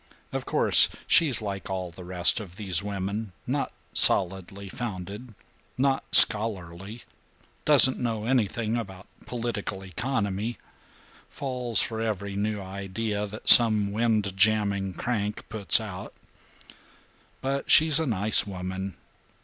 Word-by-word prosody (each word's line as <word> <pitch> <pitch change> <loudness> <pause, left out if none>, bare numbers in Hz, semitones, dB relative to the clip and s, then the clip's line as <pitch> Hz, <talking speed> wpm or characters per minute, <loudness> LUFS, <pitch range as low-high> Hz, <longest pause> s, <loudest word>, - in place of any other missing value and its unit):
Of - - -6
course - - +3 0.2
she's 140 -10 +4
like 100 -2 -6
all 95 -2 -5
the 90 +2 -13
rest 90 +5 +2
of 95 -5 -11
these 95 -4 -1
women 100 +1 -5
not - - -3 0.2
solidly 95 +1 +3
founded 105 +1 -8 0.4
not 135 +1 0
scholarly 105 0 +2 0.6
doesn't 140 -3 +5
know 115 -3 -4
anything 115 -2 -1
about 95 -4 -8 0.2
political 115 -5 -5
economy 105 +1 -4 0.7
falls 125 -5 -2
for 110 -1 -5
every 100 -3 -4
new 105 +1 -3
idea 100 +2 -5
that 105 +2 -12
some 110 -4 +6
windjamming 105 -3 0
crank 105 -4 -4
puts 110 -1 +4
out. 100 -4 -9 1.3
But 135 +1 -4
she's 155 -1 +7
a 160 - -2
nice 105 -2 +1
woman. 95 0 -6
105 Hz, 115 wpm, -25 LUFS, 95-115 Hz, 1.3 s, she's